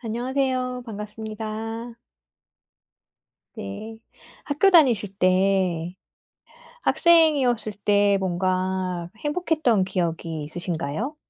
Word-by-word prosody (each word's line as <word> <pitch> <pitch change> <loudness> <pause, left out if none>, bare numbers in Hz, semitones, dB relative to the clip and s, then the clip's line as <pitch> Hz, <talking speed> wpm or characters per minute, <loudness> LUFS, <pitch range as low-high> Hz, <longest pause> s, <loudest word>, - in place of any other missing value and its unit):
안녕하세요 255 +2 -2
반갑습니다. 220 +2 -6 1.6
네. 215 - -7 0.5
학교 295 +7 +3
다니실 240 - +4
때 185 -2 +2 0.9
학생이었을 285 - +3
때 205 -1 +4
뭔가 185 -1 -1
행복했던 295 - +1
기억이 165 -4 -3
있으신가요? 170 - -4
215 Hz, 195 characters per minute, -24 LUFS, 185-250 Hz, 1.6 s, 다니실